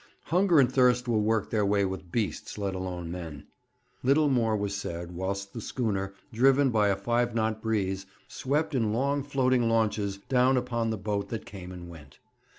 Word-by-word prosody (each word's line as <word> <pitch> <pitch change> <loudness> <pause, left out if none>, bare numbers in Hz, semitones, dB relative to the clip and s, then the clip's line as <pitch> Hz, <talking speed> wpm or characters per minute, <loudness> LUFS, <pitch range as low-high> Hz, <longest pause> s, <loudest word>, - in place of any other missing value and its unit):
'Hunger 175 -1 +3
and 130 -2 +4
thirst 125 -1 +3
will 110 -3 +2
work 110 0 0
their 110 -2 +2
way 100 0 +2
with 95 -2 -5
beasts, 105 +1 -2
let 100 -2 -2
alone 90 -2 -4
men.' 80 -5 -7 0.6
Little 145 +3 +3
more 115 -5 +2
was 100 -1 -2
said 85 -3 -5
whilst 100 +2 -4
the 115 - -6
schooner, 100 -5 -2 0.2
driven 135 +3 +4
by 105 -2 +3
a 100 - +2
five 120 +4 0
knot 110 -1 0
breeze, 95 -4 -1 0.2
swept 150 +4 -1
in 115 -5 +1
long 140 +4 +1
floating 130 -4 +1
launches 105 -3 +1
down 125 +5 +2
upon 120 -2 -1
the 110 - -1
boat 100 0 -2
that 115 - -5
came 90 -3 -9
and 90 -1 -9
went. 75 -5 -13
110 Hz, 180 wpm, -28 LUFS, 95-125 Hz, 0.6 s, and